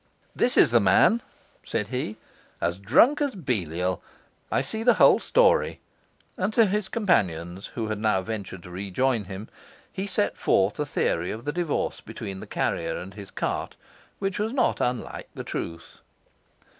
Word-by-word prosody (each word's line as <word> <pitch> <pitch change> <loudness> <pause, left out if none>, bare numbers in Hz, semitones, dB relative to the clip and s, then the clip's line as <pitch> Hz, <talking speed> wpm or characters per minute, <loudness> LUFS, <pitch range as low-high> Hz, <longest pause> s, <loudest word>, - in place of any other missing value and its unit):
'This - - +1
is - - +7
the - - +6
man,' 235 +2 +4 0.4
said 105 - -2
he, 125 -4 -3 0.4
'as 85 +2 -1
drunk 170 - +4
as 285 -5 0
Belial. 90 - -2 0.5
I - - +2
see 220 - -4
the 240 +1 +5
whole - - +6
story'; - - +3 0.6
and 190 +3 0
to 230 -1 +6
his 205 0 0
two - - -18
companions, 95 - 0
who 115 - -2
had 110 -1 -2
now 105 -3 +1
ventured 95 -4 -6
to 90 - -11
rejoin 100 +5 0
him, 95 +3 -7 0.5
he 195 +1 -3
set 205 +1 0
forth 95 +6 +2
a 150 - -1
theory 85 -9 0
of 115 +3 -6
the 145 - -1
divorce 170 -3 -1
between 95 -1 -7
the - - -9
carrier - - -1
and 95 +2 -8
his 100 -1 -9
cart, - - -3 0.4
which 195 -1 -2
was 220 +3 -1
not 255 -3 +1
unlike 125 0 -2
the - - -5
truth. 85 0 -6
115 Hz, 170 wpm, -26 LUFS, -, 0.6 s, is